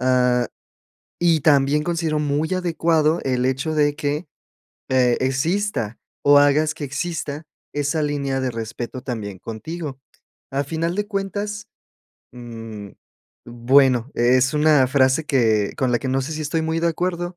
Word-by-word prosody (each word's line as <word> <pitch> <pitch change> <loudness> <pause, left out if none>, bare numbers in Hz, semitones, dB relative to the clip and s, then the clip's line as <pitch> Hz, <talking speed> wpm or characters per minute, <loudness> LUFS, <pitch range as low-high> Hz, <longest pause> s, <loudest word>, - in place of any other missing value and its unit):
Ah, 125 -1 +2 0.7
y 170 -2 +3
también 145 0 +3
considero 165 -2 -1
muy 150 +3 -1
adecuado 165 -3 +1
el 125 -1 0
hecho 135 +4 -1
de 145 -1 +3
que, 150 +2 -2 0.6
eh, 125 -2 +3
exista, 135 - -1 0.2
o, 145 0 +7
hagas 150 +2 +3
que 150 - -5
exista 150 +1 -4 0.3
esa 145 +2 0
línea 140 -2 -1
de 130 -1 -1
respeto 115 +2 -6
también 110 -7 -5
contigo. 135 - -6 0.5
A 140 +1 0
final 165 +4 -2
de 205 +1 -1
cuentas, 205 0 -4 0.7
mm, 115 -4 -9 0.6
bueno, 125 +1 +3
es 130 +3 +3
una 150 -3 +4
frase 130 +3 +2
que 110 -7 +2
con 130 -2 0
la 120 - +2
que, 130 - -4
no 135 +1 +1
sé, 145 +5 -5
si 155 - -4
estoy 160 +2 -1
muy 160 +1 -1
de 170 - +1
acuerdo 175 +1 -2
145 Hz, 145 wpm, -22 LUFS, 125-160 Hz, 0.7 s, o